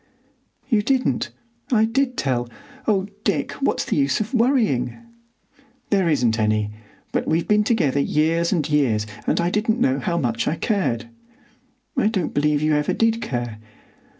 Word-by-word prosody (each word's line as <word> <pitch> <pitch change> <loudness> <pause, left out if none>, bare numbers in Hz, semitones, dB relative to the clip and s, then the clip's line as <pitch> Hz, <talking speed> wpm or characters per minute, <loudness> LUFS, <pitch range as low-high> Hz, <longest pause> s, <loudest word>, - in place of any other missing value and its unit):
"You 220 -5 +3
didn't. 255 +4 0 0.4
I 220 -3 +4
did 250 +2 0
tell. 120 -3 -1 0.4
Oh, 195 -3 +2 0.2
Dick, 160 -11 0
what's 275 - +1
the - - -1
use 140 -2 +2
of 215 +4 -3
worrying?" 225 - +2 0.9
"There 190 -4 +3
isn't 120 -6 +2
any; 105 -1 +1 0.4
but - - -1
we've 165 +1 +1
been 210 0 +4
together 165 - +1
years 160 +4 +1
and 160 -7 +1
years, 130 -9 +2 0.2
and - - +2
I 170 +1 +1
didn't 220 +3 +1
know 260 +1 +2
how 175 -4 -1
much 120 -7 -1
I 155 - +1
cared." 160 - -1 0.9
"I 260 -6 +2
don't 195 -7 -1
believe 150 0 +1
you 155 0 +2
ever 150 0 +1
did 225 0 +1
care." 120 -4 -4
165 Hz, 155 wpm, -22 LUFS, 135-220 Hz, 0.9 s, I